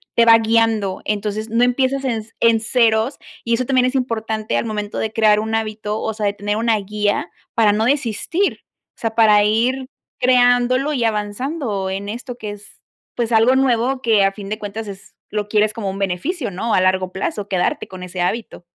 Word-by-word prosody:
te 235 - +5
va 230 0 +8
guiando, 225 -3 +1
entonces 210 +1 -2
no 230 +2 +2
empiezas 260 +2 +1
en 225 -4 -1 0.2
en 230 -1 +4
ceros 225 +2 +2 0.3
y 235 - 0
eso 250 +2 +1
también 255 -1 +2
es 255 - 0
importante 225 -4 -2
al - - -1
momento 210 -2 -4
de 220 - -2
crear 215 -2 +4
un 220 +1 -4
hábito, 215 -1 -3
o 220 - -2
sea, 215 -1 -3
de 200 - 0
tener 205 0 -2
una 225 0 +2
guía 205 +1 -1 0.2
para 220 -2 +4
no 220 +1 +1
desistir, 285 - 0 0.4
o - - -25
sea, 225 -1 -2
para 210 -2 +5
ir 245 +5 +1 0.3
creándolo 250 +2 +3
y 250 - 0
avanzando 210 0 -2
en 200 +1 -4
esto 245 +3 -6
que 215 -3 -6
es, 205 0 -13 0.3
pues 235 -1 -1
algo 230 +4 +4
nuevo 255 0 +1
que 220 -5 +3
a 195 - +2
fin 200 -1 -8
de 215 - -2
cuentas 210 +1 -6
es 195 0 -11 0.2
lo 210 -1 -3
quieres 215 0 +2
como 210 -4 -4
un 195 +1 -5
beneficio 205 - -2
¿no? 215 +5 -2
A 185 - +4
largo 185 0 +1
plazo 195 +2 -3
quedarte 185 -3 -1
con 185 -1 -10
ese 180 0 -5
hábito. 215 +1 -3
220 Hz, 200 wpm, -19 LUFS, 205-240 Hz, 0.4 s, va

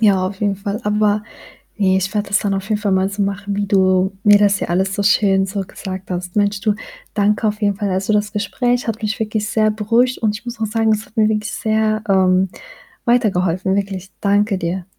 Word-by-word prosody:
Ja, 195 -4 +3
auf 195 +2 -7
jeden 205 -2 0
Fall. 200 +3 -4
Aber 210 0 +1 0.5
ne, 190 -2 +2
ich 190 0 -1
werde 205 -1 -1
das 200 - +3
dann 205 - -1
auf 195 0 -4
jeden 215 -1 0
Fall 205 -2 0
mal 190 0 +2
so 200 +1 -2
machen, 200 0 -3
wie 205 0 -1
du 190 -1 +2
mir 205 -1 +7
das 205 -1 +3
hier - - -3
alles 190 +3 0
so 205 - -1
schön 195 -2 +3
so 195 0 -3
gesagt 190 0 -8
hast. 180 +1 -4
Mensch 205 -1 +1
du, 210 0 +1 0.4
danke 210 +1 +1
auf 210 +1 -4
jeden 205 -1 +1
Fall. 205 -1 -2
Also, 190 +3 0
das 210 0 0
Gespräch 245 +4 -1
hat 225 -1 -3
mich 215 0 -2
wirklich 215 -1 -2
sehr 215 -1 +2
beruhigt 230 +4 +1
und 215 -2 0
ich 215 - -14
muss 240 -2 -7
auch 220 - +1
sagen, 220 0 +1
es 215 +1 -2
hat 220 - -26
mir 215 -1 +4
wirklich 215 0 -1
sehr, 215 0 0
ähm, 190 -1 +3 0.6
weitergeholfen, 190 -6 +1
wirklich, 195 -1 -3
danke 205 0 +2
dir. 175 +1 -3
205 Hz, 225 wpm, -19 LUFS, 190-215 Hz, 0.6 s, mir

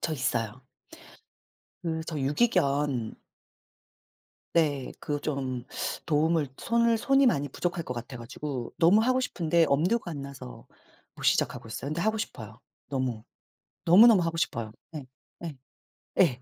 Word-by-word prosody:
저 160 - -1
있어요. 120 -3 -2 1.2
그 160 -1 -2
저 160 - -4
유기견 140 - +1 1.4
네. 145 -5 +1
그 145 -1 -3
좀 130 -4 -3 0.4
도움을 155 -1 +2
손을 235 -1 +2
손이 270 +2 +4
많이 145 - +2
부족할 175 +3 -3
것 125 - -4
같아 120 +2 -7
가지고 125 +1 -6
너무 180 +6 +6
하고 255 +2 +2
싶은데 170 -7 +2
엄두가 175 +7 +1
안 145 -3 -5
나서 135 - -10 0.5
못 - - -12
시작하고 115 - +1
있어요. 135 +4 -5
근데 155 - -2
하고 220 +3 +1
싶어요 110 - -6 0.3
너무. 130 -5 -2 0.6
너무너무 200 +3 +8
하고 165 0 -2
싶어요. 115 -8 -2 0.2
예. 140 -3 -6 0.4
예. 155 -5 -6 0.6
예. 125 -1 +4
150 Hz, 265 characters per minute, -28 LUFS, 130-175 Hz, 1.4 s, 너무너무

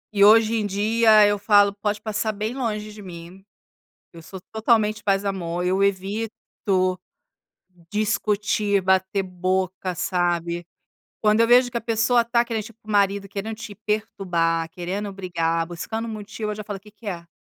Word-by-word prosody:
E 200 - +5
hoje 220 +1 +6
em 215 - -1
dia 215 +2 +4
eu 205 0 +1
falo 205 -1 +5
pode 205 +1 -2
passar 215 0 -2
bem 215 +3 -3
longe 215 -5 -3
de 210 - -11
mim. 180 0 -11 0.7
Eu 165 - -11
sou 190 +4 -10
totalmente 220 -1 +2
paz 195 0 +1
e - - -4
amor, 180 -3 -2
eu 190 +2 +1
evito 195 -1 -1 0.9
discutir 210 -1 +1
bater 190 +1 +1
boca, 185 0 -2
sabe? 175 -1 -1 0.6
Quando 215 +1 +3
eu 230 - +5
vejo 245 +1 +5
que 240 - -5
a 235 - -2
pessoa 230 +1 +2
tá 235 0 +2
querendo 225 -2 -2
tipo 225 0 -13
o 215 - -10
marido, 200 -1 +2
querendo 205 +3 -5
te 215 -2 -8
perturbar 180 -6 -1
querendo 195 +4 -4
brigar 165 -3 -1
buscando 220 +7 -5
motivo 215 0 -5
eu - - -4
já 210 0 -7
falo: 205 -1 -5
"O - - -25
que 210 +2 -16
que 210 +1 -17
é? 170 -3 -5
205 Hz, 170 wpm, -23 LUFS, 185-215 Hz, 0.9 s, hoje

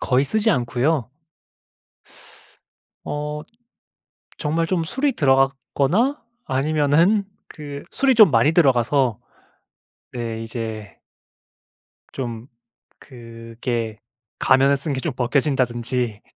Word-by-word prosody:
거의 130 +1 +2
쓰지 215 +9 +1
않고요. 125 - 0 1.9
어. 150 0 -4 1.0
정말 160 +2 0
좀 170 -1 0
술이 270 - -1
들어갔거나 135 - +1 0.2
아니면은 155 +8 +2 0.2
그 145 -2 -9
술이 270 -1 +2
좀 215 -6 +7
많이 120 +4 +3
들어가서. 130 -5 +2 0.9
네. 115 -2 -4
이제. 110 -2 -6 1.2
좀 120 -3 -5 0.5
그게 115 -2 -6 0.4
가면을 135 +1 +4
쓴 140 +2 -4
게 130 - -2
좀 160 -2 -3
벗겨진다든지 125 -3 -1
135 Hz, 185 characters per minute, -22 LUFS, 120-155 Hz, 1.9 s, 좀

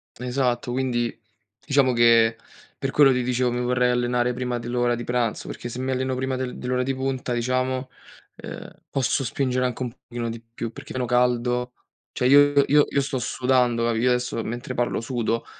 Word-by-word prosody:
Esatto, 125 -1 -1
quindi 120 -2 -1 0.5
diciamo 140 -3 +3
che 115 -1 +5 0.4
per 135 - -2
quello 145 -2 +6
ti 125 -1 +1
dicevo 125 0 +1
mi 120 - -2
vorrei 125 0 +2
allenare 120 0 +1
prima 125 0 -2
dell'ora 120 0 0
di 120 - -5
pranzo, 120 -3 -1
perché 120 - -6
se 125 - -6
mi 130 +1 -2
alleno 130 0 -1
prima 130 0 -2
del 130 -1 -4
dell'ora 125 0 -1
di 135 +1 -1
punta, 130 -1 -2
diciamo, 130 +2 -1 0.5
uhm, - - -7 0.2
posso 135 0 0
spingere 130 +1 0
anche 125 0 -2
un 120 - -4
pochino 120 -1 -6
di 115 0 -6
più, 115 0 -7
perché - - -10
meno 130 -1 -1
caldo. 125 0 +1 0.4
Cioè 125 - 0
io 145 +1 +6
io 145 +1 +5
io 140 - +1
sto 135 -1 -2
sudando, 125 -1 +1
capi 115 -1 0
io 125 +2 +3
adesso 125 -2 0
mentre 120 +2 -5
parlo 120 -2 -1
sudo. 115 -2 -2
125 Hz, 185 wpm, -24 LUFS, 120-130 Hz, 0.5 s, quello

